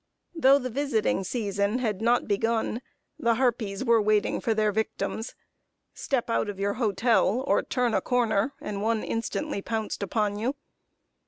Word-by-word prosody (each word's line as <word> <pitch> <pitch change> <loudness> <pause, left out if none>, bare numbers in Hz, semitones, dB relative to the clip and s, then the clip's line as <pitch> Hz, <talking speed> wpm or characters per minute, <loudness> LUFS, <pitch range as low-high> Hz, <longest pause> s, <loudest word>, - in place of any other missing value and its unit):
Though 280 -4 +5
the 255 -2 -4
visiting 235 -7 0
season 200 0 -1
had 220 -5 -2
not 240 +2 +2
begun, 225 +3 0 0.4
the 230 0 +2
harpies 230 -5 0
were 230 -1 +4
waiting 210 0 +1
for 225 - 0
their 215 -1 +2
victims. 220 +1 -3 0.6
Step 265 -4 -1
out 230 -2 0
of 200 -1 -6
your 200 +1 0
hotel, 230 +1 +2
or - - +3
turn 250 -3 0
a - - +2
corner, 240 -1 +1
and 200 -1 -5
one 220 0 0
instantly 230 +1 -3
pounced 220 0 -3
upon 205 +1 -1
you. 250 +6 -1
225 Hz, 155 wpm, -27 LUFS, 210-245 Hz, 0.6 s, Though